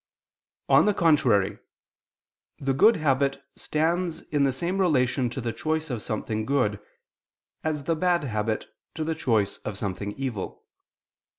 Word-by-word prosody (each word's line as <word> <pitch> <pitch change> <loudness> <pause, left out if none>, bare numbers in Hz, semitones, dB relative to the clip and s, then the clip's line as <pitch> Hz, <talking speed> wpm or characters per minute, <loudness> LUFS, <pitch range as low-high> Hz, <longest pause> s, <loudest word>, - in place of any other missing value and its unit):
On - - +6
the 210 -1 +2
contrary, 115 - +3 1.0
The 135 -1 -1
good 215 - +6
habit 140 -3 +1 0.2
stands 165 +2 -1
in 145 -1 +2
the 140 -1 +4
same 175 +8 -2
relation 130 -7 +2
to 120 - -5
the 115 -2 -3
choice 155 +4 -2
of 120 -3 -3
something 110 0 -3
good, 110 -5 +1 0.8
as 155 -2 -1
the 165 +3 0
bad 175 0 +1
habit 110 -3 -1 0.3
to 160 - -2
the 160 +1 -1
choice 110 -10 0
of 105 -2 -6
something 100 0 -3
evil. 125 -7 -5
135 Hz, 140 wpm, -26 LUFS, 110-160 Hz, 1.0 s, On